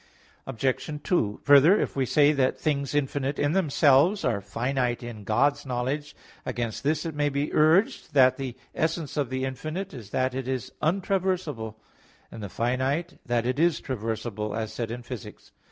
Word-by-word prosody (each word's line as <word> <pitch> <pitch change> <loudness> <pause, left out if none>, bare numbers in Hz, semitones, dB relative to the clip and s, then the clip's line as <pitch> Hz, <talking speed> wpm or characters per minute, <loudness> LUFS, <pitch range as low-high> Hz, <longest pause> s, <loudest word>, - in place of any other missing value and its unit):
Obj. 135 +4 -2
2: 110 - 0
Further, 145 +7 +7
if - - -2
we 135 -2 0
say 150 +2 +5
that 135 -3 +1
things 140 -2 -1
infinite 140 0 -1
in 145 0 +1
themselves 160 +1 +3
are 100 -3 0
finite 120 +4 -1
in 115 -3 -7
God's 130 +8 +2
knowledge, 135 +3 -3 0.3
against 120 -3 -3
this 155 +2 0
it 165 - -3
may 145 0 +1
be 140 +1 -2
urged 160 +3 +3
that 130 -2 +6
the 130 -3 -5 0.2
essence 160 -2 -1
of 145 -5 0
the 130 0 -2
infinite 155 +9 -5
is 115 -7 -9
that 130 +4 0
it 130 -1 -4
is 130 -1 -3
untraversable, 180 - -1 0.6
and 115 - -8
the 100 - -5
finite 130 - -1
that 120 -1 +1
it 130 +3 -1
is 170 0 +3
traversable, 110 -3 -4
as 110 -1 -3
said 115 -2 -3
in 120 +1 -6
Phys. 120 -3 -6
iii. - - -10
135 Hz, 170 wpm, -26 LUFS, 120-150 Hz, 0.6 s, Further